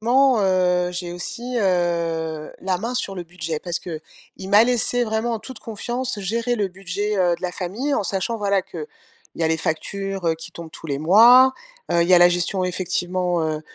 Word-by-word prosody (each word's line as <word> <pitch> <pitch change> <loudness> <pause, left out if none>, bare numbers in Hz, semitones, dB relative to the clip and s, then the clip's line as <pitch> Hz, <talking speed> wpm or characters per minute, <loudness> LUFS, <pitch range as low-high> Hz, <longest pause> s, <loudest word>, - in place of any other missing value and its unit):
ment, 250 +1 +4
heu, 180 -2 +2
j'ai 175 -1 -5
aussi, 240 +7 -5
heu, 170 -4 -1
la 185 -1 0
main 235 +5 -4
sur 195 -5 -2
le 180 - -5
budget. 165 -2 -5
Parce 175 -2 -3
qu'il 160 -3 -7 0.5
m'a 210 +3 +6
laissé 245 0 +1
vraiment 220 +2 -1
en 225 - -2
toute 255 +2 -10
confiance 240 +2 -4
gérer 230 +5 -1
le 200 -2 0
budget, 195 +3 -3
heu, 175 -2 +3
de 180 - -20
la 180 -1 -2
famille 215 - -3
en 205 - 0
sachant, 200 +5 -2
voilà, 200 -2 +1
qu'il 170 -5 -8 0.5
y 170 - -4
a 160 - +3
les 160 0 +1
factures, 195 +4 -3
heu, 165 - +3
qui 165 - -10
tombent 170 -1 -10
tous 160 - -10
les 140 -2 -2
mois, 235 - +7 0.4
heu, 170 - +3
il 170 - +2
y 185 - +7
a - - +7
la 175 0 +7
gestion, 180 +2 0
effectivement, 180 -1 -1
heu 155 -1 -2
185 Hz, 205 wpm, -22 LUFS, 175-220 Hz, 0.5 s, mois